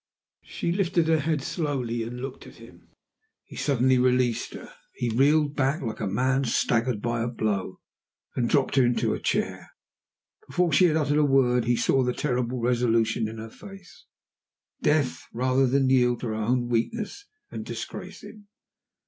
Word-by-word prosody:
She 170 Hz, -, -3 dB
lifted 175 Hz, -3 st, +1 dB
her 160 Hz, -1 st, +4 dB
head 150 Hz, -1 st, -1 dB
slowly 130 Hz, -9 st, -2 dB
and 120 Hz, +2 st, -6 dB
looked 135 Hz, -1 st, -7 dB
at -, -, -14 dB
him. -, -, -16 dB, 0.6 s
He -, -, -13 dB
suddenly 130 Hz, -2 st, +2 dB
released 125 Hz, -2 st, +1 dB
her; -, -, -10 dB, 0.2 s
he 120 Hz, -, -2 dB
reeled 145 Hz, +5 st, +3 dB
back 135 Hz, +2 st, 0 dB
like 110 Hz, -3 st, -4 dB
a 105 Hz, -, -2 dB
man 130 Hz, +7 st, +1 dB
staggered 115 Hz, -1 st, 0 dB
by 120 Hz, -1 st, -1 dB
a 115 Hz, -, -1 dB
blow, 105 Hz, -5 st, -2 dB, 0.6 s
and 120 Hz, -2 st, 0 dB
dropped 140 Hz, -1 st, +2 dB
into 120 Hz, -1 st, +2 dB
a -, -, -4 dB
chair. -, -, -2 dB, 0.8 s
Before 175 Hz, -3 st, 0 dB
she 180 Hz, +6 st, +6 dB
had 160 Hz, -2 st, +3 dB
uttered 150 Hz, -1 st, +1 dB
a -, -, +4 dB
word 125 Hz, -4 st, +3 dB
he 120 Hz, +1 st, +2 dB
saw 135 Hz, -, +2 dB
the 125 Hz, -1 st, 0 dB
terrible 125 Hz, -3 st, -1 dB
resolution 115 Hz, -2 st, +1 dB
in 110 Hz, +1 st, -8 dB
her 110 Hz, 0 st, -8 dB
face 195 Hz, -, -14 dB, 0.8 s
Death, 145 Hz, -4 st, 0 dB
rather 130 Hz, +2 st, +2 dB
than 135 Hz, +1 st, +2 dB
yield 125 Hz, -2 st, +3 dB
to 120 Hz, -, -3 dB
her -, -, -2 dB
own 120 Hz, +3 st, 0 dB
weakness 215 Hz, -, -2 dB, 0.3 s
and -, -, -5 dB
disgrace -, -, -7 dB
him. 210 Hz, -2 st, -13 dB
125 Hz, 165 wpm, -26 LUFS, 120-145 Hz, 0.8 s, she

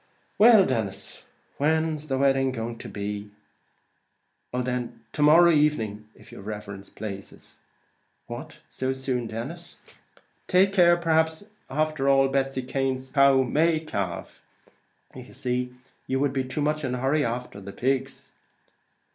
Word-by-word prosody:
"Well, 220 Hz, -3 st, +8 dB
Denis, 110 Hz, -6 st, -3 dB
and -, -, -24 dB, 0.7 s
when's 155 Hz, 0 st, -6 dB
the 135 Hz, -2 st, -1 dB
wedding 135 Hz, -1 st, +2 dB, 0.3 s
to -, -, -8 dB
be?" 105 Hz, 0 st, -5 dB, 1.2 s
"Oh 125 Hz, 0 st, -1 dB
then, 125 Hz, -2 st, -4 dB
to 150 Hz, -, -3 dB
morrow 165 Hz, +4 st, +7 dB
evening, 110 Hz, -9 st, +1 dB
if -, -, -17 dB
yer -, -, -10 dB
riverence 100 Hz, -1 st, -7 dB
plazes." 100 Hz, -2 st, -9 dB, 0.7 s
"What! -, -, -9 dB
so 130 Hz, 0 st, -2 dB
soon, 130 Hz, -3 st, -2 dB
Denis? 140 Hz, +11 st, -7 dB, 0.7 s
Take 190 Hz, +2 st, +4 dB
care; 175 Hz, -2 st, +5 dB
perhaps 160 Hz, +1 st, +1 dB, 0.3 s
after 155 Hz, -1 st, 0 dB
all 135 Hz, 0 st, +4 dB
Betsy 135 Hz, -1 st, -1 dB
Cane's 130 Hz, 0 st, -2 dB
cow 140 Hz, -2 st, +5 dB
may 155 Hz, +5 st, +2 dB
calve; 100 Hz, -, -5 dB, 0.9 s
see; 125 Hz, 0 st, -1 dB
would -, -, -21 dB, 0.3 s
you 135 Hz, +2 st, +1 dB
be 135 Hz, -1 st, -2 dB
too 130 Hz, +3 st, -4 dB
much 150 Hz, +1 st, 0 dB
in 130 Hz, -2 st, -1 dB
a -, -, -4 dB
hurry 140 Hz, +4 st, +1 dB
after 120 Hz, -4 st, -4 dB
the 100 Hz, -, -8 dB
pigs?" 135 Hz, +4 st, -2 dB
135 Hz, 135 wpm, -26 LUFS, 120-150 Hz, 1.2 s, Well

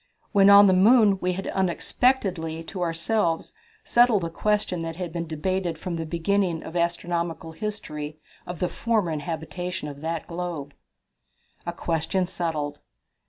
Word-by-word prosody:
When 200 Hz, -2 st, +6 dB
on 200 Hz, 0 st, +9 dB
the 190 Hz, -, +5 dB
moon 205 Hz, +1 st, +5 dB
we 180 Hz, 0 st, 0 dB
had 195 Hz, +2 st, -5 dB
unexpectedly 185 Hz, -3 st, 0 dB
to 180 Hz, +3 st, -7 dB
ourselves 170 Hz, +1 st, 0 dB, 0.3 s
settled 240 Hz, -5 st, +4 dB
the 165 Hz, -, -3 dB
question 205 Hz, -2 st, 0 dB
that 165 Hz, -1 st, -4 dB
had 175 Hz, -2 st, -5 dB
been 170 Hz, -1 st, -3 dB
debated 170 Hz, +2 st, -2 dB
from 170 Hz, +1 st, -4 dB
the 165 Hz, -1 st, -4 dB
beginning 170 Hz, 0 st, 0 dB
of 165 Hz, -, -9 dB
astronomical 170 Hz, -1 st, -1 dB
history 155 Hz, -6 st, -5 dB, 0.3 s
of 180 Hz, -, -5 dB
the 180 Hz, -, +1 dB
former 195 Hz, -8 st, 0 dB
habitability 160 Hz, +3 st, -4 dB
of 145 Hz, -1 st, -7 dB
that 165 Hz, 0 st, -3 dB
globe. 170 Hz, -5 st, -5 dB, 0.9 s
A -, -, 0 dB
Question 170 Hz, +3 st, -1 dB
Settled. 160 Hz, -5 st, -3 dB
175 Hz, 145 wpm, -25 LUFS, 165-190 Hz, 0.9 s, on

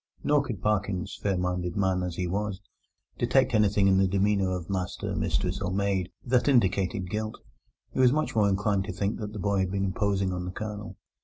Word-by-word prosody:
Nor 145 Hz, -1 st, +3 dB
could 120 Hz, -9 st, -6 dB
Parkins, 100 Hz, -3 st, 0 dB
fair 100 Hz, -2 st, 0 dB
minded 90 Hz, -1 st, -2 dB
man 95 Hz, -2 st, +1 dB
as 90 Hz, -2 st, -3 dB
he 90 Hz, -, -2 dB
was, 100 Hz, +2 st, -2 dB, 0.6 s
detect -, -, +3 dB
anything 105 Hz, -2 st, +3 dB
in 95 Hz, -1 st, +4 dB
the 95 Hz, -, +4 dB
demeanour 100 Hz, 0 st, +2 dB
of 90 Hz, -2 st, -3 dB
master, 95 Hz, -2 st, -3 dB
mistress, -, -, -1 dB
or 95 Hz, -2 st, -1 dB
maid 95 Hz, -2 st, 0 dB, 0.2 s
that 125 Hz, +1 st, +2 dB
indicated 95 Hz, -6 st, +2 dB
guilt. 110 Hz, +3 st, -3 dB, 0.5 s
He -, -, -4 dB
was 125 Hz, -1 st, +6 dB
much 155 Hz, -2 st, 0 dB
more 105 Hz, -2 st, +4 dB
inclined 100 Hz, 0 st, +1 dB
to 105 Hz, -, -5 dB
think 100 Hz, +2 st, -2 dB
that 105 Hz, -2 st, -5 dB
the 105 Hz, -, -7 dB
boy 100 Hz, 0 st, 0 dB
had 95 Hz, -1 st, +1 dB
been 100 Hz, 0 st, -1 dB
imposing 95 Hz, -1 st, 0 dB
on 90 Hz, 0 st, -3 dB
the 90 Hz, -, -4 dB
Colonel. 105 Hz, +1 st, -6 dB
100 Hz, 205 wpm, -27 LUFS, 95-105 Hz, 0.6 s, was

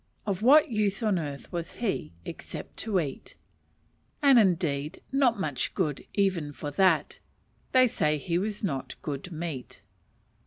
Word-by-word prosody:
Of 200 Hz, -2 st, -2 dB
what 285 Hz, +4 st, +6 dB
use 210 Hz, 0 st, 0 dB
on 205 Hz, -5 st, +2 dB
earth 145 Hz, -3 st, -6 dB
was 170 Hz, -1 st, -4 dB
he 195 Hz, -, -2 dB
except -, -, -8 dB
to 210 Hz, -4 st, 0 dB
eat? 140 Hz, -5 st, -5 dB, 0.9 s
And, 275 Hz, -4 st, +7 dB
indeed, 165 Hz, -5 st, +1 dB
not 265 Hz, -5 st, +3 dB
much 145 Hz, -8 st, -2 dB
good 155 Hz, -8 st, -1 dB
even 180 Hz, -7 st, +1 dB
for 145 Hz, +1 st, -5 dB
that 180 Hz, 0 st, +2 dB, 0.5 s
they 255 Hz, -1 st, +6 dB
say 150 Hz, -9 st, +1 dB
he 170 Hz, +4 st, -1 dB
was 210 Hz, +2 st, -3 dB
not 140 Hz, -9 st, -3 dB
good 145 Hz, +4 st, -5 dB
meat. 155 Hz, -6 st, -6 dB
180 Hz, 145 wpm, -28 LUFS, 150-215 Hz, 0.9 s, And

